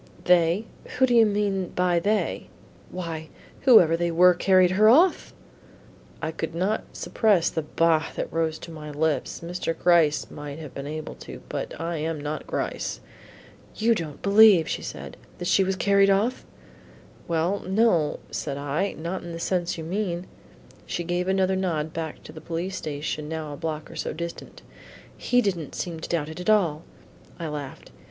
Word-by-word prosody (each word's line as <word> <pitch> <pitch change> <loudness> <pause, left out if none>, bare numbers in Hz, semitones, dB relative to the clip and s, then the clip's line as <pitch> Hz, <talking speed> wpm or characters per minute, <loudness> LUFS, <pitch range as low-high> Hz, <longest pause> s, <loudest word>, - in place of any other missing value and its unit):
"They? 180 +3 +3 0.3
Who 260 - +5
do 245 - 0
you 230 -2 +6
mean 200 -3 -1
by 180 -1 +2
they?" 210 +4 -1 0.4
"Why, 165 -3 -6 0.4
whoever 180 - +7
they 170 +1 0
were 180 +2 +6
who - - -14
carried 185 -2 +5
her 210 +3 +5
off." 335 +10 +4 0.9
I 160 - -1
could 160 0 -5
not 195 +5 0
suppress 200 -7 +2
the 160 - -1
"bah!" 160 +1 +1
that - - -4
rose 160 -1 0
to 170 - -10
my 155 -2 -8
lips. 150 +1 -1
Mr. 170 -1 -3
Gryce 170 -4 +3
might 145 0 -7
have 155 -4 -9
been 140 +1 -6
able 155 +1 -5
to, - - -9
but - - -5
I 165 +1 -3
am 155 0 -2
not 150 +1 -5
Gryce. - - -3 0.8
"You 230 +2 +3
don't 160 -8 -5
believe," 200 -4 +7
said - - -6
she, - - -24
"that 175 - -5
she 195 - +4
was 190 0 0
carried 200 +1 +4
off?" 215 +6 +1 0.8
"Well, 170 +4 0
no," 190 -6 +1
said 140 -2 -3
I, 145 +8 -1
"not 170 +4 -4
in 170 -1 -8
the 165 - -6
sense 175 0 -1
you 160 - -5
mean." 180 0 -2 0.6
She 175 - -3
gave 175 +1 -1
another 190 0 +2
nod 160 -5 -2
back 160 -2 -5
to - - -10
the 155 - -11
police 175 +4 -4
station 150 0 -4
now 160 -2 -4
a - - -6
block 155 0 -5
or - - -11
so - - -3
distant. 170 +1 -7 0.5
"He 245 0 +2
did'nt 175 -7 -2
seem 170 -2 -4
to - - -7
doubt 160 -3 -1
it 160 - -8
at 180 - -3
all." 175 -8 +3 0.6
I 165 - -4
laughed. 145 -3 -7
170 Hz, 175 wpm, -25 LUFS, 160-190 Hz, 0.9 s, whoever